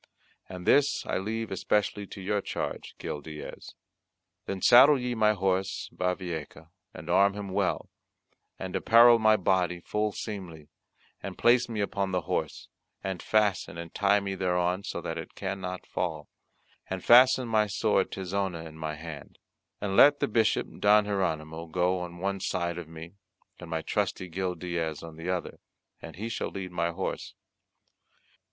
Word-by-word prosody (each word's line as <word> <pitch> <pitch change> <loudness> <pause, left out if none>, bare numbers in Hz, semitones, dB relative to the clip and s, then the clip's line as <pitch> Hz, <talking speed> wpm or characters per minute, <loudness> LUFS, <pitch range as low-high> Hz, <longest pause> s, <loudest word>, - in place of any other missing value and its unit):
And 90 -1 -8
this 140 0 +3
I - - -1
leave 110 +3 -3
especially 100 +1 0
to 100 - -9
your 100 +2 0
charge, - - -5
Gil 75 - -5
Diaz. 75 0 -9 0.7
Then 95 - -3
saddle 130 +8 +7
ye 125 0 -2
my 110 -2 +3
horse 95 -1 -1
Bavieca, 85 -4 -4 0.2
and 75 - -11
arm 100 +3 +4
him 100 -1 -5
well; 95 0 -1 0.7
and 95 -1 -6
apparel 115 +1 +6
my 110 0 +5
body 90 -2 +1
full 105 +4 -1
seemlily, 90 -9 -7 0.5
and - - -7
place 120 +1 +4
me 110 -3 -2
upon 100 -1 -1
the 90 -1 0
horse, - - -3 0.4
and 95 -2 -3
fasten 105 -5 +1
and 85 -1 -8
tie 100 0 +3
me 100 -1 -4
thereon 90 0 0
so - - -4
that - - -4
it - - -9
cannot 95 -2 -5
fall: 80 -4 -3 0.6
and 95 -1 -4
fasten 125 +1 +7
my 110 -2 +2
sword 100 - +1
Tizona 95 -3 -3
in 80 0 -11
my 80 -1 -3
hand. 75 -2 -9 0.4
And 100 -1 -2
let 145 +6 +7
the - - +1
Bishop 110 -1 +1
Don 105 0 +5
Hieronymo 80 -5 -2
go 90 +2 +1
on 90 -1 -7
one 100 +2 -2
side 85 -1 -2
of 85 -2 -9
me, 80 +4 -10 0.4
and - - -10
my 80 -1 -2
trusty 90 +3 -2
Gil 90 +1 -2
Diaz 85 -3 -3
on 80 -1 -9
the 80 +3 -6
other, 90 -2 -3 0.4
and - - -9
he 105 +5 -5
shall 115 - -3
lead 95 -2 -6
my 85 -1 0
horse. 90 +3 -4
95 Hz, 160 wpm, -28 LUFS, 85-105 Hz, 0.7 s, saddle